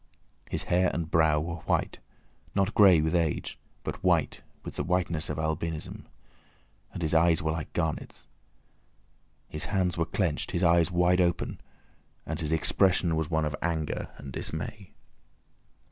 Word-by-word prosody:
His - - -2
hair 90 +1 +2
and 85 -2 -3
brow 80 -2 +4
were 85 +2 -4
white—not 95 -1 -3
grey 95 -7 +7
with 80 +2 0
age, 85 -4 -1 0.2
but - - -5
white - - +2 0.2
with - - -7
the - - -2
whiteness 85 -3 -1
of - - -3
albinism—and 80 0 -3 1.0
his 80 - -1
eyes 85 +1 +4
were 80 - 0
like 80 -1 -4
garnets. 80 -3 -3 1.2
His 75 - -5
hands 95 -4 0
were 85 - +2
clenched, 85 -3 -1
his 85 - 0
eyes 85 -1 +4
wide 90 0 +3
open, 85 -1 -1 0.6
and 80 0 -4
his 75 -2 -2
expression 85 +1 +3
was 80 -1 -1
one 80 -2 +1
of 75 0 -2
anger 80 -3 -2
and 70 -2 -9
dismay. 100 +4 -4
85 Hz, 145 wpm, -28 LUFS, 80-90 Hz, 1.2 s, grey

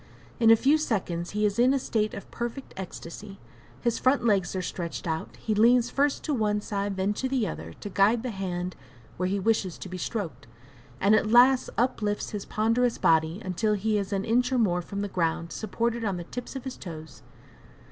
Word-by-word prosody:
In 225 -1 +5
a 225 - +9
few 280 +7 +3
seconds 180 - -2
he 210 - +2
is 205 +1 0
in 255 +3 +5
a - - +3
state 215 -4 -1
of 200 - -9
perfect 240 +3 -5
ecstasy, 195 +2 -8 0.4
his 235 -2 0
front 260 -1 +2
legs 195 -5 +2
are 185 - -1
stretched 170 -2 -5
out, 160 -1 -3
he 220 - -2
leans 235 +3 +4
first 280 0 +1
to 300 - -1
one 210 -4 +1
side, 200 -1 -3
then 190 +2 +1
to 260 +5 -2
the 255 -5 +1
other, - - -6
to - - -5
guide 205 +4 +3
the 250 - -2
hand 180 -2 -4 0.4
where 180 +1 0
he 200 +1 0
wishes 195 -3 0
to - - -8
be 185 0 -6
stroked, 165 - -4 0.5
and 200 +2 +4
at 215 0 +3
last 250 +3 +6
uplifts 215 -4 0
his 205 -2 -5
ponderous 230 +3 +1
body 160 +5 +2
until 210 +4 0
he 210 +1 +1
is 200 0 -4
an 195 -1 -1
inch 245 +3 +2
or 260 - +2
more 180 -7 +2
from 200 +3 -5
the - - -1
ground, 165 -2 -1
supported 230 +2 -2
on 200 -4 -1
the 175 - -5
tips 245 +9 -7
of 265 - -5
his 260 -1 -6
toes. 160 -5 -9
210 Hz, 210 wpm, -27 LUFS, 185-235 Hz, 0.5 s, a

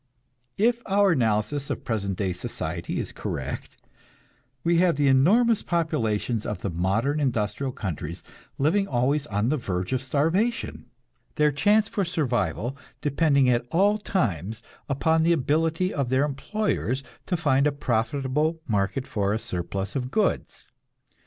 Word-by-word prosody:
If 235 +3 +2
our 200 0 +4
analysis 120 +1 +1
of - - -4
present 100 -5 -2
day 95 -3 -1
society 85 -1 -4
is - - -3
correct, 65 +2 -5 0.9
we 170 0 +3
have 175 -3 +4
the 145 0 +2
enormous 205 - +4
populations 120 - 0
of 105 - -4
the 100 - -2
modern 105 - 0
industrial 125 -1 -1
countries, 85 -6 -5 0.3
living 190 +8 +2
always 140 +3 +1
on 105 +3 0
the 155 - +1
verge 90 -4 -3
of 130 - 0
starvation, 165 - 0 0.5
their 150 -1 +3
chance 205 +9 +3
for 200 - -1
survival 120 - -1 0.3
depending 140 -2 +3
at 120 -1 +3
all 200 +7 +3
times 110 - -2 0.3
upon 160 +4 +2
the 170 +1 +4
ability 165 +4 +1
of 140 -4 -1
their 130 +3 +3
employers 140 - -2 0.2
to 180 - 0
find 145 -3 +3
a - - +2
profitable 140 +5 0
market 105 +4 0
for 100 -4 0
a - - +1
surplus 95 0 -4
of 130 -2 -2
goods. 215 +9 -1
135 Hz, 140 wpm, -25 LUFS, 110-165 Hz, 0.9 s, our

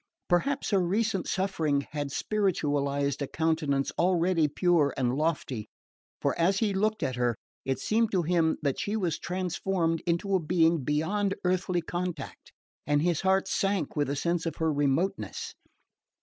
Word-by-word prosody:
Perhaps 265 +12 +1
her 200 - +4
recent 195 +2 0
suffering 160 -7 0
had 145 -2 -3
spiritualised 145 -8 0
a 140 - -1
countenance 155 -4 0
already 175 -2 +3
pure 155 -1 +2
and 125 -2 +1
lofty; 145 -7 -2 0.5
for - - 0
as 185 +4 +3
he 205 -1 +1
looked 215 0 0
at 130 -3 -1
her 120 -1 +1 0.3
it 135 -1 0
seemed 220 - +1
to 185 -3 +1
him 165 -1 +2
that 140 -3 0
she 205 - -1
was 180 -7 -1
transformed 180 -2 -1
into 175 +4 0
a 190 - +4
being 165 -2 +2
beyond 195 +8 0
earthly 180 -1 0
contact, 175 +1 -5 0.4
and 145 +1 +2
his 175 -3 +1
heart 190 0 +2
sank 195 -1 0
with 145 -1 +1
the 140 - -1
sense 170 +3 -1
of 165 - -3
her 160 -1 0
remoteness. 145 +7 -1
170 Hz, 155 wpm, -28 LUFS, 145-190 Hz, 0.5 s, her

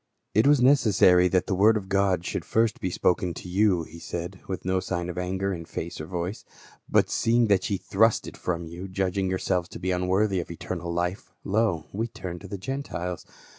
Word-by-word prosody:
" - - -52
It 110 +5 +4
was 145 -3 +5
necessary 105 -9 +5
that 90 0 +1
the - - -1
word 105 +4 +5
of 95 -3 -6
God 95 -3 +1
should - - -3
first 115 -1 +1
be 95 - -1
spoken 90 0 +1
to - - -8
you," 95 -2 +2
he 80 +1 -11
said 85 +2 -5
with 95 -3 -5
no 95 0 +1
sign 85 -1 -3
of 90 - -6
anger 95 +2 -1
in 85 -2 -5
face 80 0 -6
or 75 - -7
voice; 90 +4 -4 0.5
"but - - +3
seeing 115 +1 +3
that 95 -2 +2
ye 100 - 0
thrust 110 +5 +2
it - - -8
from 85 -1 -3
you, 85 +4 -7
judging 95 0 -1
yourselves 90 -1 -1
to - - -9
be 95 +1 -1
unworthy 95 +2 +1
of 85 - -5
eternal 85 0 -5
life, 90 +3 -2
lo, 95 -6 +1
wc 115 +3 -3
turn 90 -5 -6
to 100 - -10
the 100 - -5
Gentiles. 90 -7 -4
95 Hz, 210 wpm, -26 LUFS, 90-100 Hz, 0.5 s, was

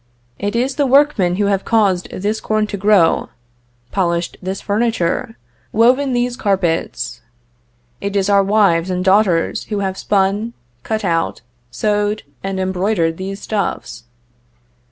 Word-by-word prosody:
It 205 +2 -2
is 255 +3 0
the 285 -2 +2
workmen 260 -10 +3
who 205 +2 +1
have 195 -1 +1
caused 200 -6 +1
this 210 +3 -3
corn 215 0 0
to 210 - -5
grow, 200 -4 +3 0.6
polished 170 -3 -1
this 190 +1 -4
furniture, 225 +1 -1 0.3
woven 255 +5 +3
these 245 0 0
carpets; 170 - -1 0.8
it 200 0 -3
is 195 -1 +2
our 200 -1 +5
wives 195 -4 +2
and 180 0 -2
daughters 190 -3 +2
who 205 -2 -3
have 190 -1 -3
spun, 205 +3 0 0.3
cut 215 - -3
out, 165 -6 -1 0.3
sewed, 210 - -1 0.2
and 195 0 -3
embroidered 185 -3 0
these 195 +1 -6
stuffs. 120 - -3
200 Hz, 135 wpm, -18 LUFS, 185-215 Hz, 0.8 s, our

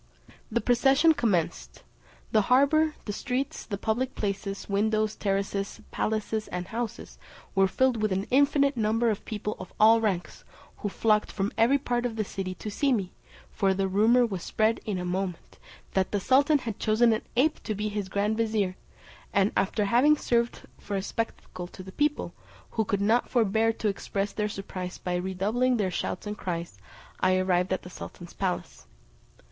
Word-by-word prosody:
The 235 +1 +1
procession 270 +6 +4
commenced; 170 - -1 0.5
the 215 - +4
harbour, 300 +4 +4
the 205 - -3
streets, 270 +6 -3
the 200 - -3
public 240 +5 -1
places, 200 -1 -3
windows, 215 +1 +1
terraces, 195 0 -2
palaces, 215 0 -1
and 180 0 -5
houses, 235 0 -5 0.3
were 195 -1 +4
filled 245 +3 +1
with 215 -1 +1
an 190 +1 0
infinite 280 +1 +4
number 225 +1 +2
of 210 - -4
people 210 -1 -4
of - - -8
all 225 +1 +7
ranks, 190 -5 -2 0.3
who 205 - -3
flocked 210 +1 +1
from 195 +2 -1
every 240 +5 +4
part 245 -3 -1
of 230 - -7
the 220 - 0
city 190 -2 -5
to 210 - -6
see 275 +6 +1
me; 195 -7 0 0.4
for 195 -1 +1
the 195 0 0
rumour 225 +6 +4
was 195 -6 -4
spread 220 +5 +1
in 205 -3 -1
a 180 - -3
moment, 180 -1 -4 0.3
that 190 -1 +1
the 205 - +1
sultan 280 +8 +4
had 230 -6 -5
chosen 225 +2 +4
an 220 - -1 0.2
ape 305 +5 +2
to 215 - -3
be 210 +2 -2
his 205 -2 -3
grand 205 +3 0
vizier, 215 -5 0 0.5
and 200 +1 +3
after 205 +2 +1
having 255 +8 +4
served 235 -3 0 0.2
for 200 - -5
a 195 - -1
spectacle 185 -5 -4
to 185 - -11
the 190 - -10
people, 295 +7 0 0.4
who 220 - +1
could 200 -1 -1
not 225 +4 +2
forbear 225 -1 +2
to 225 -1 -3
express 200 0 -2
their 210 -1 -2
surprise 185 -2 -6
by 180 - -3
redoubling 200 +8 0
their 195 -4 0
shouts 180 - -3
and 210 0 -5
cries, 170 - -4 0.4
I 185 0 +3
arrived 185 0 +1
at 185 - -1
the 180 - -10
sultan's 175 -1 -9
palace. 185 - -3
215 Hz, 175 wpm, -27 LUFS, 195-235 Hz, 0.5 s, all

